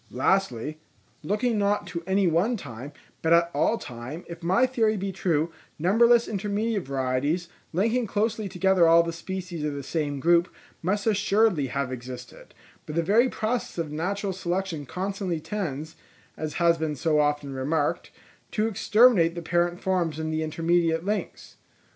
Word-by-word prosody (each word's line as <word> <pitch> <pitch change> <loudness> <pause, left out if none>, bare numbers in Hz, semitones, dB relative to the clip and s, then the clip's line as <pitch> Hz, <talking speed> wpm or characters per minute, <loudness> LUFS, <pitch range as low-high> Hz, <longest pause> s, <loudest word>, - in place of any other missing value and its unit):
Lastly, 150 -1 0 0.4
looking 215 +6 0
not 205 0 +1
to 170 - -5
any 190 +1 +2
one 180 +8 +2
time, 135 - -8 0.3
but 165 +1 +3
at 170 0 +4
all 230 - +2
time, 125 - -8
if 170 0 -9
my 190 +9 +3
theory 225 -4 +1
be 195 0 -3
true, 170 -3 0 0.3
numberless 230 +8 +4
intermediate 205 - -2
varieties, 140 +6 -1 0.2
linking 225 +7 +1
closely 215 0 -1
together 185 -1 +3
all 165 +1 +6
the 170 0 -4
species 180 -1 -5
of 150 -1 -2
the 140 - -5
same 145 -1 -2
group, 170 +3 +3 0.3
must 200 +4 -1
assuredly 205 -6 +2
have 130 0 -2
existed; 130 - -9 0.3
but 150 - -5
the 170 - +2
very 225 +9 +4
process 230 -1 -2
of 165 -3 -3
natural 195 +5 -2
selection 180 -4 -3
constantly 190 -1 -3
tends, 160 -5 -4 0.4
as 155 -1 -4
has 170 -1 +3
been 155 -2 -1
so 155 +2 +1
often 145 -1 0
remarked, 145 +3 -1 0.4
to 215 - 0
exterminate 215 -4 +4
the 170 - -4
parent 175 +1 0
forms 175 -5 0
and 160 0 -3
the 155 - -1
intermediate 165 +1 +1
links. 210 +1 -4
175 Hz, 155 wpm, -26 LUFS, 155-200 Hz, 0.4 s, all